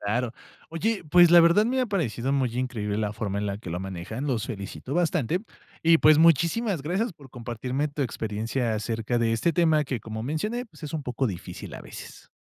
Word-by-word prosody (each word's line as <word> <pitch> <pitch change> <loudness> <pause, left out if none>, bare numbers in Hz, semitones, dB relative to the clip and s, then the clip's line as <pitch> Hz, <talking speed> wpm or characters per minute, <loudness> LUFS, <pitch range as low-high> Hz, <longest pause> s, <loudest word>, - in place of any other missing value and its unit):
Claro. 115 +3 -1 0.4
Oye, 205 +7 -1
pues 175 +1 +7
la 175 0 +9
verdad 170 +6 +5
me 260 +3 +1
ha 255 - +1
parecido 135 - -1
muy 130 -4 0
increíble 115 -5 -2
la 105 -1 -1
forma 100 -1 -3
en 105 - -2
la 100 0 -3
que 90 -6 -8
lo 90 - -3
manejan, 95 +8 -5
los 120 -6 -1
felicito 115 +4 -6
bastante. 175 - +1 0.4
Y, 165 0 +6
pues, 155 0 +6
muchísimas 170 - +3
gracias 185 - -1
por 140 -5 -16
compartirme 125 +4 -3
tu 145 0 -3
experiencia 115 0 -2
acerca 115 +2 -1
de 115 -1 +1
este 115 +9 +1
tema 155 -2 +3
que, 130 -4 -3
como 110 +1 -6
mencioné, 210 - -2
pues 215 - -19
es 150 0 -6
un 155 - -3
poco 125 0 -1
difícil 90 -5 -7
a - - -8
veces. - - -11
130 Hz, 205 wpm, -26 LUFS, 110-165 Hz, 0.4 s, la